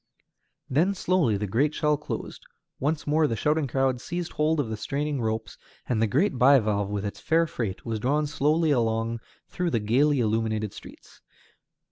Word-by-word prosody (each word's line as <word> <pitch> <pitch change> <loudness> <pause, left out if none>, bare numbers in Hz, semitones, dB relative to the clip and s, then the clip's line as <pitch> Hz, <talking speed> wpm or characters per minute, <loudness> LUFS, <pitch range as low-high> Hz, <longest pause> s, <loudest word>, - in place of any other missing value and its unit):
Then 170 +9 +2
slowly 175 - +1
the 105 - -2
great 140 +10 +1
shell 150 -1 +2
closed, 150 - -6 0.4
once 150 +3 -1
more 155 +1 +3
the 115 - -2
shouting 150 +5 +1
crowds 130 -1 0
seized 175 -1 -4
hold 155 +1 +1
of 140 - 0
the 110 - -2
straining 140 +5 -2
ropes, 110 0 -3 0.3
and 110 -3 0
the 115 - +3
great 140 - +1
bivalve 110 -7 +4
with 105 0 -3
its 100 - -5
fair 165 +1 +2
freight 115 - -4
was 115 -2 -2
drawn 145 +6 +1
slowly 150 +2 +1
along 115 -2 0 0.3
through 180 -1 -2
the 115 - 0
gayly 135 +7 +2
illuminated 110 -2 0
streets. - - -14
135 Hz, 170 wpm, -26 LUFS, 110-150 Hz, 0.4 s, bivalve